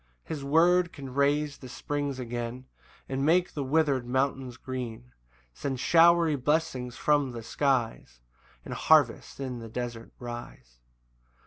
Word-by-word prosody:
2 -, -, -5 dB
His 145 Hz, -3 st, -5 dB
word 170 Hz, +5 st, +4 dB
can 135 Hz, -2 st, -9 dB
raise 145 Hz, +1 st, +1 dB
the 130 Hz, -, -10 dB
springs 145 Hz, +1 st, -3 dB
again, 120 Hz, 0 st, -5 dB, 0.4 s
And 135 Hz, 0 st, -2 dB
make 175 Hz, +4 st, +3 dB
the 145 Hz, -, -3 dB
wither'd 140 Hz, -2 st, +2 dB
mountains 130 Hz, -1 st, -1 dB
green, 125 Hz, -2 st, -6 dB, 0.4 s
Send 130 Hz, -, -4 dB
showery 170 Hz, 0 st, +5 dB
blessings 130 Hz, -3 st, -1 dB
from 145 Hz, -4 st, +2 dB
the 115 Hz, -1 st, -7 dB
skies, 115 Hz, -, -1 dB, 0.5 s
And -, -, -6 dB
harvests 145 Hz, -7 st, +3 dB
in 130 Hz, -3 st, -4 dB
the 115 Hz, -1 st, -8 dB
desert 120 Hz, 0 st, -5 dB
rise. 120 Hz, -, -9 dB
135 Hz, 135 wpm, -28 LUFS, 120-150 Hz, 0.5 s, showery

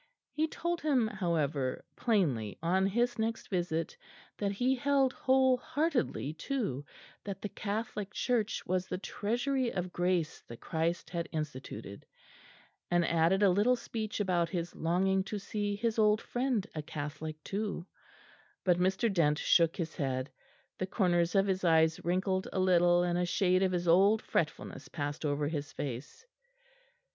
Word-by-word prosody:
He 315 Hz, +1 st, 0 dB
told 345 Hz, +2 st, -2 dB
him, 275 Hz, -6 st, +3 dB
however, 155 Hz, -10 st, -1 dB
plainly 145 Hz, -, +1 dB
on 190 Hz, +3 st, +3 dB
his 240 Hz, +4 st, 0 dB
next 225 Hz, +1 st, -2 dB
visit 175 Hz, -, -1 dB, 0.4 s
that 200 Hz, -1 st, -1 dB
he 250 Hz, +6 st, +2 dB
held 270 Hz, 0 st, +2 dB
whole 260 Hz, -1 st, +3 dB
heartedly 280 Hz, -, -1 dB
too 165 Hz, -, -3 dB, 0.4 s
that 200 Hz, -1 st, -5 dB
the 205 Hz, -, -2 dB
Catholic 210 Hz, -1 st, -4 dB
Church 225 Hz, -2 st, 0 dB
was 185 Hz, 0 st, -1 dB
the -, -, -3 dB
treasury 245 Hz, +6 st, -1 dB
of 180 Hz, -1 st, -4 dB
Grace 175 Hz, -3 st, 0 dB
that 115 Hz, -, -9 dB
Christ 165 Hz, +1 st, -2 dB
had 170 Hz, -1 st, -3 dB
instituted, 130 Hz, -9 st, -6 dB, 0.9 s
and 175 Hz, -1 st, +3 dB
added 170 Hz, +5 st, +3 dB
a 195 Hz, -, +6 dB
little 210 Hz, +7 st, +4 dB
speech 220 Hz, -3 st, -4 dB
about 180 Hz, -4 st, +1 dB
his 170 Hz, -2 st, -3 dB
longing 190 Hz, +3 st, +1 dB
to 210 Hz, -, -4 dB
see 205 Hz, 0 st, -2 dB
his 225 Hz, +1 st, -1 dB
old 210 Hz, 0 st, +4 dB
friend 245 Hz, -5 st, -1 dB
a 155 Hz, -, -3 dB
Catholic 150 Hz, +1 st, -5 dB
too; 200 Hz, -3 st, -3 dB, 0.8 s
but 180 Hz, -2 st, +3 dB
Mr. 190 Hz, +5 st, +2 dB
Dent 150 Hz, -5 st, +3 dB
shook 165 Hz, -1 st, +3 dB
his 165 Hz, -2 st, -4 dB
head. 130 Hz, -1 st, -2 dB, 0.5 s
The 185 Hz, -, -1 dB
corners 175 Hz, -2 st, +1 dB
of 195 Hz, 0 st, +5 dB
his 190 Hz, -1 st, -1 dB
eyes 160 Hz, -1 st, +3 dB
wrinkled 185 Hz, +2 st, 0 dB
a -, -, -1 dB
little, 175 Hz, -1 st, +4 dB
and 175 Hz, 0 st, 0 dB
a 180 Hz, -, +1 dB
shade 185 Hz, +1 st, +2 dB
of 190 Hz, -1 st, +2 dB
his 175 Hz, -1 st, -1 dB
old 200 Hz, +6 st, +5 dB
fretfulness 145 Hz, -3 st, -2 dB
passed 145 Hz, +1 st, -4 dB
over 145 Hz, 0 st, 0 dB
his 145 Hz, -2 st, -4 dB
face. 140 Hz, -, -6 dB
185 Hz, 155 wpm, -31 LUFS, 165-215 Hz, 0.9 s, a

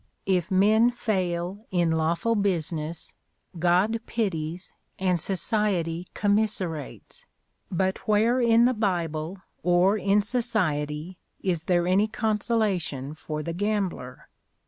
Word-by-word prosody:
If 185 Hz, -2 st, +1 dB
men 215 Hz, +5 st, +4 dB
fail 190 Hz, -3 st, -2 dB
in 175 Hz, -3 st, +1 dB
lawful 165 Hz, +8 st, +1 dB
business, 170 Hz, -6 st, -1 dB, 0.5 s
God 180 Hz, +7 st, +3 dB
pities, 180 Hz, -5 st, -3 dB, 0.2 s
and 180 Hz, -3 st, +1 dB
society 185 Hz, -4 st, 0 dB
commiserates; 200 Hz, -8 st, -1 dB, 0.4 s
but 190 Hz, +1 st, 0 dB
where 225 Hz, +4 st, +3 dB
in 235 Hz, 0 st, +5 dB
the 255 Hz, -, +3 dB
Bible, 180 Hz, -4 st, -2 dB, 0.2 s
or 180 Hz, +4 st, +3 dB
in 200 Hz, +1 st, +3 dB
society, 180 Hz, -, -1 dB, 0.2 s
is 175 Hz, -4 st, -1 dB
there 175 Hz, -1 st, +2 dB
any 190 Hz, +4 st, +3 dB
consolation 210 Hz, -, -1 dB
for 155 Hz, -1 st, -5 dB
the 170 Hz, -, -4 dB
gambler? 190 Hz, -9 st, -2 dB
185 Hz, 105 wpm, -26 LUFS, 170-215 Hz, 0.5 s, in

